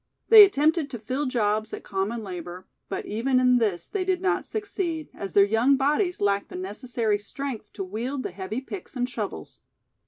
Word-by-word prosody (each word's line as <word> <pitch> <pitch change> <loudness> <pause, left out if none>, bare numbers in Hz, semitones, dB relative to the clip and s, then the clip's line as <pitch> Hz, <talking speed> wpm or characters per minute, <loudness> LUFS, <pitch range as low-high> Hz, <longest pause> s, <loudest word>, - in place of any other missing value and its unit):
They 440 -2 +12
attempted 315 -4 +2
to 250 - -5
fill 255 +6 -2
jobs 215 -3 0
at - - -6
common 205 +4 -2
labor, 180 -1 -7 0.2
but - - -4
even 255 +5 +1
in 250 -1 +4
this 195 -7 0
they 400 -3 -2
did 370 -1 0
not 380 +1 0
succeed, 355 -7 -3
as 195 - -7
their 200 -1 +6
young 230 +7 +3
bodies 300 +7 +1
lacked 200 0 +1
the - - -9
necessary 210 +3 -2
strength 230 0 -6
to - - -4
wield 240 +8 -4
the - - -4
heavy 195 +6 -5
picks 350 +3 -9
and 245 -1 0
shovels. 225 -5 -6
240 Hz, 185 wpm, -26 LUFS, 205-285 Hz, 0.2 s, They